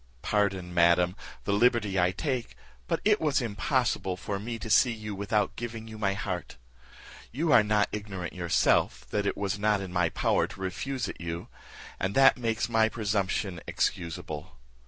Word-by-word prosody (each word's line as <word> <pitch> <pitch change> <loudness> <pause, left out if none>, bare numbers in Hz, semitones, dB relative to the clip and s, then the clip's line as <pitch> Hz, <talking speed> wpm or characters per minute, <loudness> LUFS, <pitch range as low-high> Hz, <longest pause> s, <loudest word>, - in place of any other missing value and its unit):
Pardon, 95 -4 0
madam, 85 +1 +4 0.3
the 100 - 0
liberty 105 -3 +3
I 90 0 +4
take, 125 +6 -3 0.3
but - - -1
it 210 0 +4
was 150 -3 +2
impossible 115 -4 0
for 100 +1 -4
me 115 +3 -4
to 115 - -7
see 120 +3 +5
you 105 -2 -6
without 100 +1 0
giving 115 -1 -6
you 110 -1 -9
my 100 -2 +1
heart. 90 -8 -4 0.7
You 155 +6 0
are 115 - +8
not 105 -1 +2
ignorant 100 -5 -5
yourself, 90 -2 +2
that 100 -1 0
it - - -1
was 100 +1 -2
not 105 0 +2
in 95 -2 -6
my 90 -2 +2
power - - +1
to - - -12
refuse 120 +8 -3
it - - -8
you, 85 0 -5 0.5
and 95 +2 -1
that 135 0 +7
makes 115 -2 -1
my 110 -1 +3
presumption 100 -4 -1
excusable. 80 -3 -3
105 Hz, 170 wpm, -28 LUFS, 95-115 Hz, 0.7 s, are